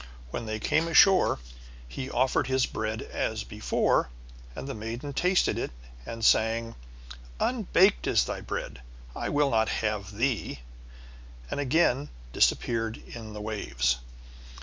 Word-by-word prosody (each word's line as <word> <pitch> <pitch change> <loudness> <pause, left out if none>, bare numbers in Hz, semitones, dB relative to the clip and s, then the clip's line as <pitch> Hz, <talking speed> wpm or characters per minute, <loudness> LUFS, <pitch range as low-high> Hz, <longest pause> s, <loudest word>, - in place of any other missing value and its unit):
When 115 - -4
they 110 0 -3
came 160 +8 +1
ashore 185 +3 +6 0.5
he 130 - -6
offered 130 +1 +1
his 130 -1 +2
bread 110 0 -3
as 110 -1 -3
before, 105 - +1 0.5
and - - -6
the 135 - -4
maiden 115 +6 -5
tasted 180 +6 +2
it - - -2 0.4
and 115 -1 -3
sang: 115 +1 +3 0.7
"Unbaked 205 -5 +3
is - - +4
thy - - -4
bread, - - -5 0.3
I - - -3
will 145 -1 +2
not 110 -1 +2
have 105 -2 -2
thee," 120 - -1 0.9
and - - -2
again 145 -1 +2 0.2
disappeared 115 -1 +1 0.2
in 110 -2 -8
the 105 - -6
waves. 65 - 0
115 Hz, 130 wpm, -28 LUFS, 110-140 Hz, 0.9 s, ashore